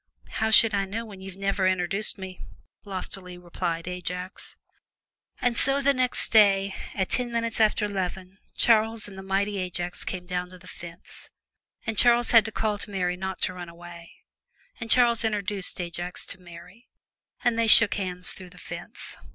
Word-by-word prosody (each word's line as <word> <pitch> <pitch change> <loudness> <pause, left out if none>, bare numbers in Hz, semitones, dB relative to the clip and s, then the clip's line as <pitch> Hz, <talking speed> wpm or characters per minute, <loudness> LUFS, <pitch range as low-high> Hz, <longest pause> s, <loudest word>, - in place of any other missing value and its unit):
"How 220 - 0
should 220 0 +7
I 200 -1 +1
know 220 +4 -5
when 200 -4 -11
you 190 - -7
have 190 0 -12
never 195 -1 +1
introduced 185 +4 +1
me!" 190 -1 -8 0.4
loftily 185 -2 -7
replied 175 -1 -4
Ajax. 180 0 -6 0.8
And 245 -1 +1
so 270 +3 +2
the 280 0 +3
next 255 -1 +1
day, 200 -3 +5 0.2
at 190 -2 0
ten 245 -1 +1
minutes 230 -1 -1
after 215 -1 +3
'leven, 190 -1 -4 0.2
Charles 225 -1 +3
and 200 - -11
the 190 - -8
mighty 195 +1 -1
Ajax 175 -1 -2
came 180 -1 -5
down 180 0 -3
to 185 - -13
the 180 - -18
fence, 170 0 -10 0.6
and 220 -3 -1
Charles 240 -1 +5
had 230 -3 +7
to 220 - -4
call 210 -1 -1
to - - -5
Mary 180 -3 -1
not 190 +1 -5
to 185 - +2
run 175 -1 -8
away, 170 0 -12 0.7
and 225 - -6
Charles 235 -2 +4
introduced 205 -4 -3
Ajax 175 0 -5
to 190 - -7
Mary 180 +6 -14 0.6
and 240 -2 +2
they 230 - +2
shook 220 0 +8
hands 180 -2 -3
through 185 -1 -9
the - - -18
fence. - - -8
195 Hz, 175 wpm, -26 LUFS, 180-220 Hz, 0.8 s, shook